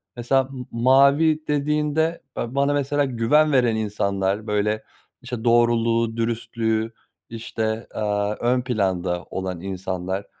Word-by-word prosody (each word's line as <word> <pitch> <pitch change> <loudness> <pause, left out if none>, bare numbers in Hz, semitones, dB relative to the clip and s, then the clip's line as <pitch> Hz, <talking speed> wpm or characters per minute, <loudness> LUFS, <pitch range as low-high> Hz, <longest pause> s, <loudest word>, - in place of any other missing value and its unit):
Mesela 130 +3 +2
m 130 -1 -8
mavi 140 +6 +4
dediğinde, 150 +2 0 0.2
eee, 120 +3 -4
bana 140 +1 +2
mesela 145 0 +1
güven 135 +5 +2
veren 125 -4 +3
insanlar 100 -1 -1
böyle 105 +1 0 0.4
işte 120 -3 -6
doğruluğu, 115 -1 +2
dürüstlüğü 115 -1 -1 0.4
işte, 110 0 -3
eee, - - -3 0.4
ön 125 +1 +2
planda 95 -7 -1
olan 95 -2 -4
insanlar 95 0 -4
115 Hz, 115 wpm, -23 LUFS, 105-135 Hz, 0.4 s, mavi